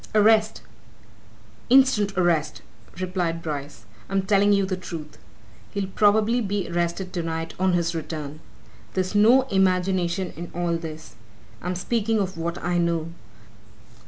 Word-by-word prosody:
"Arrest 215 0 +4 1.1
instant 245 -7 +4
arrest!" 165 -4 +1 0.4
replied 175 -3 -2
Bryce. 145 -6 -6 0.2
"I'm 195 0 0
telling 200 +1 +3
you 200 -1 +3
the 190 0 -2
truth. 170 -4 -8 0.5
He'll 200 -2 -3
probably 215 +4 +3
be 200 -3 -2
arrested 175 +2 -2
tonight, 165 -2 -3
on 185 -1 +2
his 170 -1 +1
return. 155 -2 -5 0.6
There's 185 0 -1
no 230 +6 +6
imagination 185 -1 +1
in 175 +1 -7
all 175 -1 0
this 160 -1 -8 0.5
I'm 180 +1 -3
speaking 225 +4 0
of 190 -2 -2
what 170 +1 -3
I 175 0 +1
know. 170 -1 0
180 Hz, 130 wpm, -24 LUFS, 170-200 Hz, 1.1 s, no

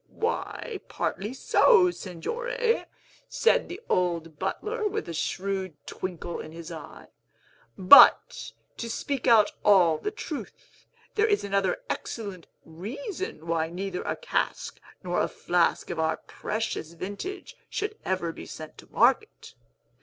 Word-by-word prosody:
"Why, 455 -1 -3
partly 205 +4 -3
so, 360 - +5
Signore," 460 - -2 0.4
said - - +2
the 360 - -6
old 170 -4 0
butler, 430 - -2
with 415 - -3
a 170 - -5
shrewd 190 +1 -2
twinkle 175 -2 -5
in - - -8
his 165 +1 -9
eye; 160 -3 -10 0.7
"but, 190 +9 +7 0.3
to 230 - -4
speak 275 +3 -3
out 220 -3 +6
all 180 -6 +5
the - - -2
truth, 345 -8 -9 0.3
there 430 +1 +3
is 415 -2 +2
another 200 - 0
excellent 200 -7 -5 0.2
reason 220 - -6
why 165 -1 0
neither 180 +1 -4
a - - -2
cask - - -2 0.2
nor 175 -1 0
a - - +1
flask 175 0 0
of 170 - -4
our 160 0 +1
precious 210 -6 -4
vintage 205 - -6
should 420 +1 -3
ever 185 -3 -1
be - - -10
sent 155 -1 -9
to - - -15
market. 265 - +2
195 Hz, 130 wpm, -27 LUFS, -, 0.7 s, but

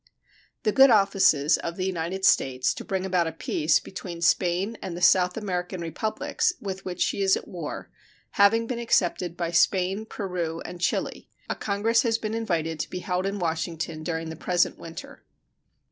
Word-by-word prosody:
The 215 - +2
good 270 +5 +7
offices 195 - +4
of 170 - -5
the 185 - -2
United 185 +1 -2
States 130 -1 +3
to - - -8
bring 190 -3 -2
about 180 -3 +1
a - - -2
peace 155 -1 +1
between 175 -3 -8
Spain 180 +5 +2
and 175 -2 -5
the - - -7
South 180 +1 +4
American 185 -3 -3
Republics 175 - -1
with 195 -5 -5
which 180 -1 -5
she - - -1
is 190 -1 +4
at - - -9
war 170 -5 -7 0.4
having 225 +3 +4
been 235 0 -3
accepted 180 -6 0
by 170 -1 -2
Spain, 190 +4 +2
Peru, 175 -6 -3
and 175 0 -8
Chile, - - -2 0.2
a - - -2
congress 220 +3 +1
has 230 -2 +1
been 220 -1 -4
invited 165 -8 -2
to - - -3
be 180 - -5
held 180 +1 -1
in 200 +1 -2
Washington 165 -2 -3
during 160 0 -3
the - - -7
present 175 +2 0
winter. 165 0 -10
180 Hz, 175 wpm, -26 LUFS, 170-200 Hz, 0.4 s, good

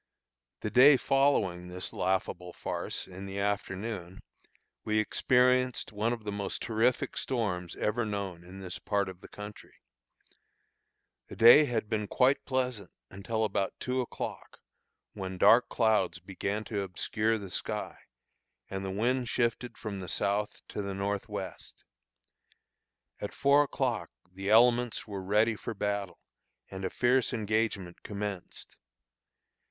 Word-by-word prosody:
The 105 - -3
day 135 +4 +8
following 125 -12 +2
this 90 +1 -5
laughable 90 -1 -1
farce, - - -3
in 95 +1 -9
the 95 0 -6
afternoon, 100 -2 -3 0.6
we 110 0 0
experienced 125 +3 +2
one 105 +2 0
of 120 -2 -4
the 105 - -3
most 100 -1 -3
terrific 120 +4 +1
storms 95 -9 -2
ever 110 +3 0
known 100 -5 -4
in 95 +2 -11
this 90 -1 -6
part 100 -2 0
of 95 -1 -11
the - - -11
country. 105 0 -10 1.5
The - - -9
day 120 +8 +9
had 115 -5 -1
been 105 -1 -1
quite 130 +6 +3
pleasant 125 -7 -1 0.2
until 110 +4 -2
about 100 -2 -1
two 130 0 -1
o'clock, 125 - -6 0.5
when 95 -2 -5
dark 115 +6 +6
clouds 110 -7 +2
began 100 +4 -3
to 105 -2 -3
obscure 105 +4 0
the 100 -3 -8
sky, - - -3 0.8
and 95 0 -3
the 95 - -3
wind 120 +5 0
shifted 120 +1 -1
from 105 -3 -5
the 90 -2 -6
south 105 +4 -1
to - - -4
the 100 -1 -4
north 100 0 -2
west. - - -7 1.4
At 105 - -5
four 140 +1 +5
o'clock 145 - -1 0.2
the 95 +2 -5
elements 120 +1 +4
were 100 -3 -5
ready 105 +4 +2
for 110 +2 -6
battle, 100 -2 -2 0.5
and 95 0 -6
a 95 - 0
fierce 125 +1 +2
engagement 110 -5 -1
commenced. 100 -3 -6
105 Hz, 135 wpm, -30 LUFS, 95-115 Hz, 1.5 s, day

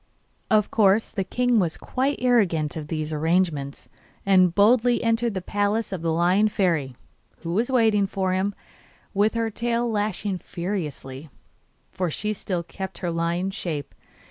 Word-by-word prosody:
Of 215 -2 +3
course 210 0 +3
the 195 - -2
king 245 +4 +1
was 170 -4 -1
quite 270 +3 -1
ignorant 195 - +2
of 155 -2 -5
these 155 0 -3
arrangements, 155 -3 0 0.4
and 185 -3 +4
boldly 240 +4 +4
entered 230 -1 +1
the 185 - -3
palace 205 +3 -1
of 190 -4 -4
the 165 -1 0
Lion 180 +6 +3
Fairy, 165 -11 0 0.5
who 170 0 -3
was 225 +7 +1
waiting 220 -6 +3
for 190 -1 -1
him, 190 +2 -1 0.6
with 210 +3 +2
her 230 -1 0
tail 235 +2 -1
lashing 205 -3 -2
furiously, 160 -7 -5 0.6
for 180 -2 -2
she 210 +7 -2
still 185 -3 -3
kept 190 +2 -7
her 175 -2 -3
lion's 170 +3 -1
shape. 160 -8 -4
195 Hz, 150 wpm, -24 LUFS, 170-220 Hz, 0.6 s, and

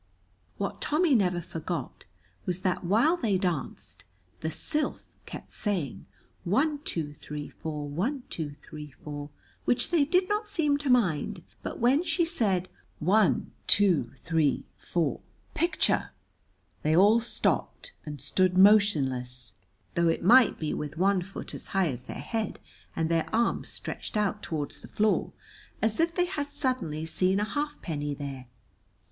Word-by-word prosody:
What 200 - -3
Tommy 310 0 +3
never 180 -7 +3
forgot 165 -1 -5 0.4
was 180 0 -1
that 185 -1 0
while 225 - +4
they 220 - +1
danced 135 - -3 0.4
the 160 - -2
Sylph 300 - -2 0.2
kept - - -9
saying, 185 - -2 0.4
"One, 285 - +1
two, 160 - -2
three, 150 0 -7
four; 150 -2 -5
one, 230 - -2
two, 160 -3 -4
three, 150 0 -9
four," 145 +1 -8 0.4
which 245 - +1
they 335 -4 +4
did 365 +5 +2
not 420 +1 -1
seem 300 -8 +1
to 285 -2 -2
mind, 195 - +2 0.2
but - - -5
when 255 +6 +4
she 350 -1 +1
said 200 - +1 0.3
"One, 205 +7 +3 0.2
two, 180 - +4
three, 160 0 0
four, 170 -3 -1 0.3
picture!" 345 +1 +1 0.7
they 155 +1 +2
all 205 +6 +6
stopped 235 - -1
and 150 -2 -7
stood 185 +4 +1
motionless, 135 - +4 0.4
though 170 0 +2
it 165 - 0
might 240 +4 +6
be 155 -2 -2
with 150 +1 -5
one 190 +1 +3
foot 190 +2 -7
as - - -5
high 185 -4 +3
as 125 0 -7
their - - -6
head 225 -3 -3 0.4
and 165 - +1
their 165 -1 +1
arms 230 +1 +1
stretched - - -5
out 210 0 0
toward 150 -3 -3
the - - -10
floor, 215 0 +1 0.5
as 220 -1 +1
if 330 +1 +2
they 355 - +3
had 305 -6 -3
suddenly 250 - -1
seen 185 +4 +1
a - - +1
halfpenny 185 - -3
there. 135 -3 -6
190 Hz, 150 wpm, -28 LUFS, 155-245 Hz, 0.7 s, all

